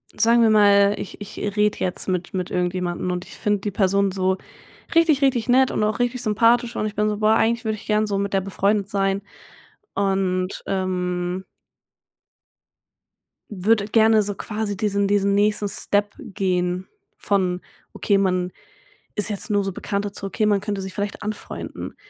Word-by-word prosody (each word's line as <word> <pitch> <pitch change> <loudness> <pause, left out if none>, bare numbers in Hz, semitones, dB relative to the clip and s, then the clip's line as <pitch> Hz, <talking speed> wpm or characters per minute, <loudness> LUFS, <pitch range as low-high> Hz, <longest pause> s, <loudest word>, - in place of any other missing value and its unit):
sagen 235 +1 +4
wir 225 - +5
mal, 205 -1 +5
ich - - -7
ich 205 - -8 0.2
rede 210 0 +2
jetzt 180 - -2
mit 180 -1 -2
mit 185 -1 -3
irgendjemanden 180 0 -2
und 180 0 -4
ich - - -11
finde 210 -2 0
die 205 - -3
Person 195 0 +2
so 190 0 0 0.6
richtig, 325 -4 +4
richtig 255 -5 +2
nett 260 +1 +4
und - - -1
auch 215 +2 0
richtig 245 0 0
sympathisch 230 +2 +2
und - - -1
ich 210 - -7
bin 210 +1 +1
so: 210 - -2
„Boah, 215 +1 +3
eigentlich 235 +2 +1
würde 220 -1 0
ich 210 - -12
gern 215 0 +2
so 200 -1 -1
mit 200 0 -2
der 195 - +2
befreundet 200 +1 0
sein.“ 195 -1 0 0.7
Und, 190 -2 -1
ähm 180 -1 -2 2.1
würde 205 +1 +1
gerne 220 0 +4
so 205 0 -1
quasi 210 0 -3
diesen 200 0 0
diesen 200 0 +2
nächsten 210 0 +2
Step 205 +1 0
gehen 180 -1 -2 0.3
von: 185 -3 0 0.3
„Okay, 200 -2 +1
man 185 -2 0 0.6
ist 210 - +4
jetzt 210 +2 -3
nur 205 -1 +2
so 195 - -2
Bekannte," 200 +2 -3
zu: 200 - -6
“Okay, 215 +2 -1
man 205 -2 +2
könnte 205 -2 -3
sich 190 -2 -6
vielleicht 205 +3 -4
anfreunden.“ 210 0 -6
200 Hz, 170 wpm, -22 LUFS, 190-215 Hz, 2.1 s, wir